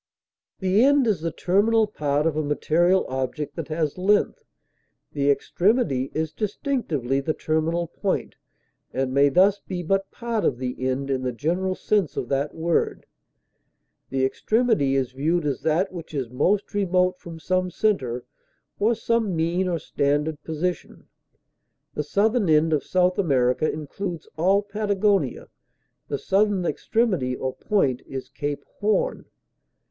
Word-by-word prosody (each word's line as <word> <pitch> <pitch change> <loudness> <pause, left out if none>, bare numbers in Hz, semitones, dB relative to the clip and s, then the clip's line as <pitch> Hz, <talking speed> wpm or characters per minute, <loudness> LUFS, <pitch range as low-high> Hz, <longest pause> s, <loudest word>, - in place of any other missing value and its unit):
The 190 +4 +3
end 280 -1 +5
is 210 -8 +1
the 165 0 -2
terminal 210 +7 +2
part 150 -7 -1
of 165 -2 +1
a 155 - +1
material 170 +5 +2
object 130 +3 -3
that 165 -3 -5
has 155 0 -2
length; 205 +3 +2 0.7
the 140 0 0
extremity 145 - +1
is 160 0 -1
distinctively 195 - -1
the 155 +3 -2
terminal 160 +2 0
point, 185 +3 -2 0.6
and 130 -1 -1
may 140 +1 +5
thus 190 +7 +4
be 180 -2 -5
but 195 +3 0
part 235 -3 -3
of 125 - +1
the 125 0 -4
end 135 +1 -2
in 130 -1 0
the 130 -1 -1
general 175 +9 -1
sense 200 -6 0
of - - -3
that 140 +2 -1
word; 165 +1 0 1.0
the 135 -1 +1
extremity 215 - +1
is 130 -2 0
viewed 155 +5 0
as 140 -4 -1
that 170 +5 +1
which 165 -3 -8
is 130 -4 -3
most 190 +11 +1
remote 185 -2 +1
from 165 -1 -9
some 185 +2 0
center, 135 - -1 0.5
or 220 +3 +3
some 225 -4 0
mean 170 +3 0
or 175 -2 0
standard 145 +1 -1
position; 165 +4 -4 0.9
the - - -2
southern 205 - +1
end 155 +1 +4
of 150 - +1
South 180 0 +1
America 135 -4 +2
includes 165 +3 -5
all 190 +6 +3
Patagonia, 200 - 0 0.6
the 140 - -2
southern 195 +2 +1
extremity 180 - 0
or 130 0 -3
point 140 - 0
is 135 -1 -6
Cape 145 0 -4
Horn. 215 - 0
170 Hz, 145 wpm, -24 LUFS, 145-200 Hz, 1.0 s, end